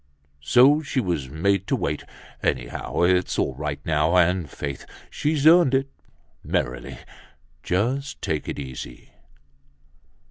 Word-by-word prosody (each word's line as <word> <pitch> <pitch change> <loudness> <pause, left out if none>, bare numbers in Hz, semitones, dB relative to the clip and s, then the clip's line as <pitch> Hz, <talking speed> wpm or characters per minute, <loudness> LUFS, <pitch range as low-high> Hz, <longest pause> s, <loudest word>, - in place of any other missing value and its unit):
So 130 - +5
she 145 -3 -2
was 85 - -2
made 95 +6 0
to - - +1
wait. - - -3 0.4
Anyhow, 60 +6 -2
it's 90 0 +2
all 70 - 0
right 75 +1 -4
now, 80 +3 +2
and 90 -2 +2
faith! 70 -2 -6 0.3
She's 150 -1 -1
earned 165 -4 +6
it! 135 +1 0 0.5
Merrily, - - -3 0.6
just 125 - -1
take 75 -2 -3
it - - -4
easy." 65 -3 -8
90 Hz, 120 wpm, -24 LUFS, -, 0.6 s, earned